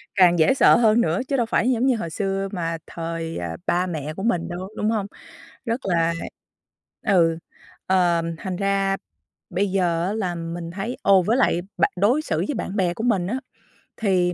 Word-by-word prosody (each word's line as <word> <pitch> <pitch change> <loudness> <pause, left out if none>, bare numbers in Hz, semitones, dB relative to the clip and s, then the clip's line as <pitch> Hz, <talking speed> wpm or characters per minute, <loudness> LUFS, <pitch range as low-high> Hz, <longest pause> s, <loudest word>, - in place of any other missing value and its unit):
càng 175 -3 +5
dễ 160 +10 +5
sợ - - +6
hơn 225 0 +4
nữa, 165 -3 +1
chứ 275 -1 0
đâu 240 - +2
phải 235 +2 +1
giống 245 +1 +1
như 260 - +3
hồi 170 -7 -4
xưa 195 +2 -2
mà 165 -3 -2
thời, 165 0 -5
ờ, 85 -1 -4
ba 180 +1 +1
mẹ 155 -3 -4
của 190 +5 -6
mình 175 -7 0
đâu, 180 +2 -5
đúng 210 - 0
hông? 215 -3 0 0.6
Rất 230 +2 -1
là 170 -2 +2 0.9
ừ, 165 -4 +4 0.5
ờ, 175 -3 +3 0.2
thành 185 0 -4
ra 195 0 +1 0.5
bây 190 +2 0
giờ 175 -3 +1
á 200 - -1
là 185 -5 -2
mình 165 0 -5
thấy 205 +7 -4
ồ, 195 -1 +5
với 220 +8 +1
lại 175 -9 +2 0.2
bạ - - +4
đối 235 +10 +3
xử - - -2
với 290 - -2
bạn 200 - -4
bè 180 -4 +1
của 220 - -5
mình 200 -8 +1
á, 250 +6 -2 0.6
thì 185 -4 +1
185 Hz, 195 wpm, -23 LUFS, 170-215 Hz, 0.9 s, sợ